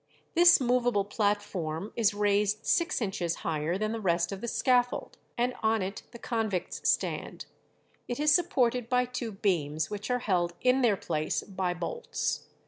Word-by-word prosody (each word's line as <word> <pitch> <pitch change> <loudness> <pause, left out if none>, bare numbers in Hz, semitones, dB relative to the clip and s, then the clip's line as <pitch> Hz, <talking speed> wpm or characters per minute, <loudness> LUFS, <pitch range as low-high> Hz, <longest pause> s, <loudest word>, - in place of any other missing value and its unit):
This 345 0 +7
movable 245 -5 +2
platform 205 -4 -2
is 225 -3 +3
raised 205 +1 +1
six 340 -5 +1
inches 180 -5 -1
higher 160 +2 -1
than 215 +1 -1
the 230 - -3
rest 170 -3 +1
of 195 0 -6
the 235 - -4
scaffold, 245 0 +1 0.2
and 245 +1 +1
on 220 -2 +2
it 195 +2 -5
the 240 - -11
convicts 220 -7 -2
stand; - - -1 0.6
it 245 - -4
is 300 0 +4
supported 250 -9 +1
by 250 0 +3
two 245 -2 -5
beams, 160 -5 -1
which 210 +2 -5
are 250 - +2
held 175 -7 0
in 255 +1 +3
their 225 -5 +3
place 155 -3 -2
by 185 -2 -2
bolts. 475 - -3
210 Hz, 160 wpm, -29 LUFS, 185-245 Hz, 0.6 s, This